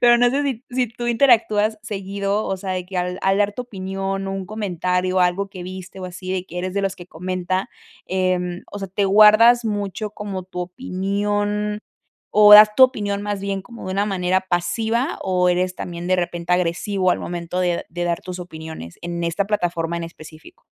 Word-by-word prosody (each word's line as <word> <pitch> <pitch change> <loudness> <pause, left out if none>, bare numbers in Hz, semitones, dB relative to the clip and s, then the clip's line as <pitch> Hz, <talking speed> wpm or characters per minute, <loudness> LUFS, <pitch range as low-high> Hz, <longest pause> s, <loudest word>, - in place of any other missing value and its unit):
pero 240 0 +6
no 245 0 +5
sé 280 +2 0
si 265 -3 -3
si 250 -1 0
tú 240 +2 -6
interactúas 225 -3 +3
seguido, 200 0 -2
o 190 - -1
sea, 190 0 -6
de 185 -1 -3
que 190 0 -7
al 180 0 -2
al 195 +1 +2
dar 205 0 +2
tu 250 - -5
opinión, 195 -2 -4
un 195 -1 -4
comentario 185 -3 -1
o - - +4
algo 180 +3 +1
que 185 -2 -9
viste, 185 +1 -8
o - - -5
así, 185 +1 -6
de 185 -1 -2
que 180 -1 -7
eres 185 +1 -3
de 200 - 0
los 195 -1 -1
que 175 - -11
comenta, 185 +2 -3 0.4
em, 180 -1 -1
o 205 - -5
sea, 195 - -5
te 200 +2 0
guardas 215 +4 +7
mucho 205 0 -3
como 200 -2 -5
tu 180 0 -7
opinión 205 +1 -2 0.6
o 210 0 +8
das 210 0 +9
tu 260 - +8
opinión 205 -5 +1
más 205 -1 -3
bien 195 -1 -3
como 235 +2 -11
de 185 - -3
una 200 +1 +1
manera 185 -2 +1
pasiva 220 - -1
o 180 -1 +1
eres 180 +1 +1
también 175 -1 -6
de 185 - +3
repente 175 -1 -3
agresivo 180 +2 0
al - - +2
momento 175 +1 -4
de 175 -1 0
de 175 +1 -4
dar 170 -1 -1
tus 185 0 -6
opiniones 160 - -9
en 170 0 -4
esta 170 +4 0
plataforma 170 -5 -1
en 170 - -4
específico. 165 - -12
190 Hz, 200 wpm, -21 LUFS, 180-210 Hz, 0.6 s, das